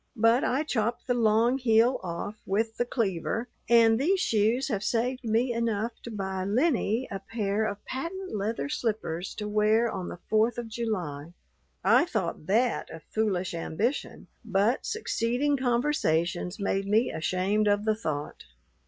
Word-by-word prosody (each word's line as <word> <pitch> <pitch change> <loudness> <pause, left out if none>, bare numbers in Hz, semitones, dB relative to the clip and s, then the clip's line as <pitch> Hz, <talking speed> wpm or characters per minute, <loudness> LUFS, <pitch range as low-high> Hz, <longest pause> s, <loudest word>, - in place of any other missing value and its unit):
But 230 +3 +4
I 270 +4 +1
chopped 235 -5 -1
the 250 - +1
long 235 +2 +3
heel 235 +1 +3
off 180 +3 -4
with 220 +3 0
the 240 - +1
cleaver, 225 0 -1 0.2
and 230 -1 +6
these 370 +8 +2
shoes 225 - +2
have 205 -5 -1
saved 250 +4 0
me 235 +2 +1
enough 230 -1 -1
to - - -8
buy 190 -3 -3
Lennie 240 - +1
a 195 - -3
pair 205 +1 -1
of 205 -1 -5
patent 340 - -5
leather 215 +6 -2
slippers 215 - -3
to 210 - -4
wear 215 +2 +2
on 185 -2 -4
the - - -7
Fourth 220 +2 +2
of 235 -1 -5
July." 175 -10 -4 0.5
I - - +5
thought 170 - -3
that 235 +4 +1
a 165 - -9
foolish 195 -5 0
ambition, 200 - -2 0.2
but 210 +3 +1
succeeding 285 - 0
conversations 235 - 0
made 195 0 -1
me 220 +4 +2
ashamed 185 +6 0
of 205 +1 +2
the 220 - +3
thought. 155 -9 -4
220 Hz, 155 wpm, -28 LUFS, 195-240 Hz, 0.5 s, and